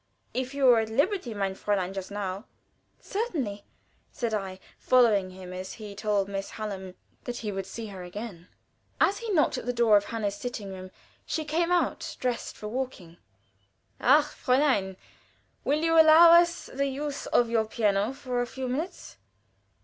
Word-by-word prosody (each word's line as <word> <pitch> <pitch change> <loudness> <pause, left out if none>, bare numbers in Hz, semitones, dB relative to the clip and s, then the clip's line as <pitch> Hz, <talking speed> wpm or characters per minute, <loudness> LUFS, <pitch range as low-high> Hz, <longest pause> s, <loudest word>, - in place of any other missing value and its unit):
If 260 +2 -3
you 280 -1 +1
were 245 -3 +7
at 220 0 -2
liberty, 285 - 0
mein 195 -1 -1
Fräulein, 190 -1 -1
just 190 -1 -5
now 200 +1 -4 0.3
" - - -44
"Certainly," 290 - -3 0.5
said 235 -3 -3
I, 190 -3 -3 0.2
following 220 -7 +4
him, 185 0 -10
as 185 +1 -6
he 210 -2 -9
told 205 -1 0
Miss 195 0 -4
Hallam 195 -4 -6 0.3
that 245 -1 -4
he 210 - -1
would 195 -1 -4
see 225 +3 -6
her 190 -2 -8
again. 180 -1 -8 0.5
As 400 - +3
he 460 -2 -4
knocked 300 -7 +2
at - - -10
the - - +2
door 230 -3 +5
of 205 - -1
Anna's 215 -3 -1
sitting 205 -2 -6
room 185 0 -8 0.3
she 315 - -3
came 335 +3 0
out, 355 -1 0
dressed 250 -2 -3
for 210 - -6
walking. 210 -8 -5 0.8
"Ach, 290 +4 +5
Fräulein! 255 -9 +1 0.7
will 300 +3 +1
you 330 0 +6
allow 320 +2 +8
us 340 0 +5
the 275 +1 -2
use 285 +1 -4
of 235 -1 +2
your 225 -1 +2
piano 210 0 +1
for 255 -3 -3
a 245 - -2
few 260 +2 -5
minutes?" 300 +9 -5
230 Hz, 170 wpm, -27 LUFS, 200-275 Hz, 0.8 s, allow